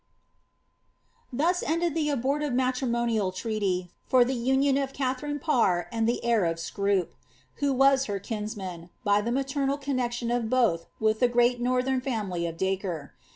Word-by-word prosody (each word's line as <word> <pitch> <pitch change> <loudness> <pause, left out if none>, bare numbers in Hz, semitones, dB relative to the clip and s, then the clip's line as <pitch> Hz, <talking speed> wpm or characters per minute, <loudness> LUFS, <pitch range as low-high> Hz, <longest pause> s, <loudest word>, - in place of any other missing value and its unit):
Thus 335 +8 +1
ended 335 0 0
the 305 -2 0
abortive 280 +1 0
matrimonial 240 -5 0
treaty 185 -3 -2 0.2
for 255 -2 +5
the 260 - -1
union 265 +3 +2
of 270 -1 -3
Katha 260 -2 -1
fine 290 0 -3
Parr 235 - +1
and 225 -1 +1
the 240 - -2
heir 230 -4 +3
of 165 0 0
Scroop, 200 +1 0 0.5
who 285 -1 +1
was 270 0 +4
her 205 -1 -2
kinsman, 200 -5 -6
by 205 0 +3
the 235 +3 -2
maternal 275 +1 0
connexion 245 -4 -2
of 240 -2 0
both 225 -10 +2
with 220 0 +2
the 245 - +5
great 240 0 +2
northern 255 +1 +1
family 205 -10 -2
of 165 0 -6
Dacre. 190 -6 -2
240 Hz, 155 wpm, -27 LUFS, 205-270 Hz, 0.5 s, for